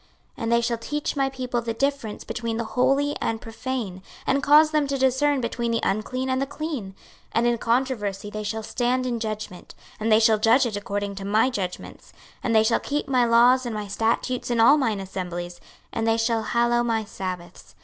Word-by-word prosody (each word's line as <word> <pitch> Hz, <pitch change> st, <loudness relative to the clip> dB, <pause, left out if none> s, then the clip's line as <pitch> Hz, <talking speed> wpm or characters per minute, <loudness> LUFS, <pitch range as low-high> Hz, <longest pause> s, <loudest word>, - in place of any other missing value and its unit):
26:044:023 -, -, -33 dB, 0.3 s
And 230 Hz, -, -1 dB
they 235 Hz, 0 st, +4 dB
shall 235 Hz, 0 st, 0 dB
teach 295 Hz, +7 st, -3 dB
my 270 Hz, -1 st, +1 dB
people 255 Hz, -2 st, -3 dB
the 230 Hz, -1 st, -3 dB
difference 275 Hz, -4 st, -2 dB
between 230 Hz, -1 st, -3 dB
the 235 Hz, -, -1 dB
holy 275 Hz, +5 st, +1 dB
and 225 Hz, 0 st, -1 dB
profane, 225 Hz, -5 st, -5 dB, 0.2 s
and 275 Hz, +1 st, +2 dB
cause 300 Hz, +3 st, +6 dB
them 300 Hz, -2 st, +1 dB
to 275 Hz, 0 st, -1 dB
discern 265 Hz, +2 st, +2 dB
between 235 Hz, 0 st, -2 dB
the 230 Hz, 0 st, +1 dB
unclean 255 Hz, +6 st, -1 dB
and 260 Hz, 0 st, 0 dB
the 275 Hz, -, -1 dB
clean. 300 Hz, -6 st, -4 dB
26:044:024 190 Hz, -, -10 dB, 0.4 s
And 230 Hz, +1 st, +2 dB
in 240 Hz, 0 st, +2 dB
controversy 225 Hz, -5 st, -1 dB
they 215 Hz, +1 st, -4 dB
shall 220 Hz, +1 st, -3 dB
stand 250 Hz, +3 st, 0 dB
in 240 Hz, -2 st, -2 dB
judgment; 215 Hz, -4 st, -6 dB, 0.2 s
and 220 Hz, +1 st, 0 dB
they 215 Hz, -, +7 dB
shall 220 Hz, -1 st, +4 dB
judge 230 Hz, +5 st, +4 dB
it 225 Hz, -4 st, -2 dB
according 205 Hz, 0 st, -3 dB
to 195 Hz, -, -5 dB
my 215 Hz, +6 st, +2 dB
judgments: 185 Hz, -6 st, -6 dB, 0.3 s
and 230 Hz, -, 0 dB
they 220 Hz, -, +6 dB
shall 230 Hz, +1 st, +2 dB
keep 295 Hz, +1 st, -3 dB
my 255 Hz, -3 st, +3 dB
laws 240 Hz, +2 st, +5 dB
and 235 Hz, -3 st, -4 dB
my 210 Hz, -1 st, -4 dB
statutes 230 Hz, +5 st, -1 dB
in 240 Hz, -1 st, 0 dB
all 255 Hz, +7 st, +7 dB
mine 225 Hz, -7 st, 0 dB
assemblies; 175 Hz, -2 st, -5 dB, 0.3 s
and 225 Hz, 0 st, -1 dB
they 225 Hz, 0 st, +3 dB
shall 225 Hz, 0 st, +1 dB
hallow 235 Hz, +2 st, +2 dB
my 225 Hz, -2 st, 0 dB
sabbaths. 185 Hz, -4 st, -7 dB
230 Hz, 210 wpm, -24 LUFS, 215-260 Hz, 0.4 s, they